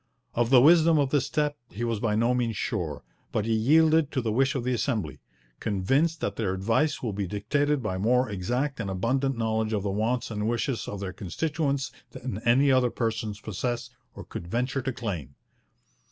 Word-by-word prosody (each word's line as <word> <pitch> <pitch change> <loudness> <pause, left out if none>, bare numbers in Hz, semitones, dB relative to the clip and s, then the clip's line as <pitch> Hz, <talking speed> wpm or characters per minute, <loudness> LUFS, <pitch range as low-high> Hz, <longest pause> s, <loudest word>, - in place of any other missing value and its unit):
Of 120 0 +1
the 130 -2 +7
wisdom 165 +1 +6
of 140 -2 +1
this 145 -4 +2
step 150 -1 0
he 115 - -5
was 115 -3 -1
by 105 -1 0
no 115 +3 +2
means 120 -4 -1
sure, 85 - -3 0.3
but 105 - 0
he 115 - +1
yielded 155 +6 +4
to 130 - +1
the 110 - 0
wish 135 +5 +2
of 130 - -1
the 125 +1 0
Assembly, 110 - -2 0.4
'convinced 135 - +1
that - - -2
their 95 -4 0
advice 115 +12 0
will 110 -4 -2
be 100 -1 -2
dictated 140 +8 0
by 95 -3 -2
more 125 +5 +3
exact 125 +8 -2
and 100 -4 -3
abundant 130 +8 0
knowledge 110 -1 0
of 100 -3 0
the 100 - -1
wants 115 +5 -1
and 105 0 -1
wishes 120 +1 -1
of 100 - -5
their 95 -2 -4
constituents 140 - -2 0.2
than 125 -5 -5
any 135 +4 +5
other 130 -2 +4
persons 110 -3 -2
possess 120 +3 -3 0.2
or - - -8
could 85 - -8
venture 125 +7 -1
to 135 +1 -2
claim.' 90 - -5
120 Hz, 195 wpm, -27 LUFS, 105-135 Hz, 0.4 s, the